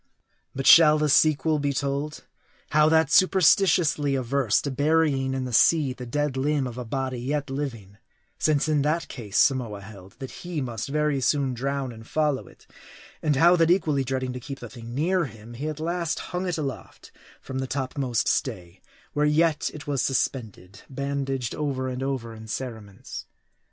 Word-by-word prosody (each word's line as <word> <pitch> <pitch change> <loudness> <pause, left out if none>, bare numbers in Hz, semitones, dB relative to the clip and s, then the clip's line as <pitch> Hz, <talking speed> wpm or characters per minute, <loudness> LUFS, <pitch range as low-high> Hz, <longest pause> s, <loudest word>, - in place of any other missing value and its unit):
But 135 0 -3
shall 155 -2 +8
the 150 0 +1
sequel, 155 +2 +3
be 145 -1 0
told? 140 +2 -3 0.5
How 155 +1 +5
that, 160 -2 +3
superstitiously 165 -6 +4
averse 130 -3 +1
to 140 - -2
burying 145 -2 +1
in 130 -1 -2
the 125 - -6
sea 150 0 +4
the 125 -1 -9
dead 145 +2 -1
limb 140 +1 0
of 125 0 -6
a - - -4
body 130 +1 -3
yet 140 +2 -2
living; 115 -8 -5 0.4
since 150 -1 +2
in 150 -2 +2
that 155 +4 0
case 105 -6 -5
Samoa 120 -7 +2
held, 100 -2 -13
that 130 - -8
he 175 -3 -4
must 120 -3 -4
very 150 -1 0
soon 135 0 +1
drown 135 +1 -3
and 115 0 -12
follow 150 -3 0
it; - - -19 0.6
and 150 -2 +1
how, 170 +5 +6
that 165 -1 +3
equally 155 -6 +2
dreading 130 0 -2
to 125 - -5
keep 135 +2 -7
the 120 - -8
thing 120 0 -9
near 175 +4 +1
him, 115 -2 -11
he 140 +6 -4
at 155 -1 -6
last 170 0 -2 0.2
hung 180 +1 -2
it 175 -3 -1
aloft 140 -4 -6 0.3
from 130 0 -6
the 130 - -3
topmast 130 -5 -2
stay; 90 0 -2 0.3
where 150 0 +2
yet 155 +1 +2
it 150 - -10
was 140 -3 -1
suspended, 110 -7 -2
bandaged 135 -2 -3
over 135 -3 -2
and 130 0 -4
over 130 -4 -3
in 110 0 -11
cerements. 110 -5 -7
140 Hz, 175 wpm, -25 LUFS, 125-150 Hz, 0.6 s, shall